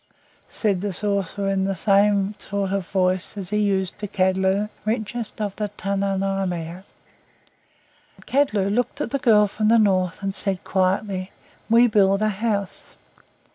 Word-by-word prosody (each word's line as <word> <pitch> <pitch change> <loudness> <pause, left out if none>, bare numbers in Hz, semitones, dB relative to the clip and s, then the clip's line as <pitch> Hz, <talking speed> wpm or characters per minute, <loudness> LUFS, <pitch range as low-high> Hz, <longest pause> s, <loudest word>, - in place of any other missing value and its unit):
said 200 -5 -1
the 205 0 -2
sorcerer 200 0 -1
in 190 -1 0
the 195 0 -1
same 200 +1 +2
sort 200 -1 -3
of 195 -2 -2
voice 185 +1 0
as 195 -1 -3
he 210 - +1
used 195 -3 0
to 210 - -4
Kadlu, 190 +2 +1 0.2
richest 220 +1 -3
of 205 -2 -3
the 210 -1 -2
Tununirmiut. 195 -3 -2 1.4
Kadlu 215 -8 +1
looked 245 +2 -1
at - - -3
the 275 - 0
girl 220 -6 +5
from 215 +1 -1
the 230 +1 +5
North, 185 -3 +1
and 195 0 -1
said 195 -2 -1
quietly, 190 0 -1 0.4
"WE 230 +2 +6
build 200 -2 +3
a 215 - +2
house." 205 -1 -3
195 Hz, 145 wpm, -23 LUFS, 190-210 Hz, 1.4 s, WE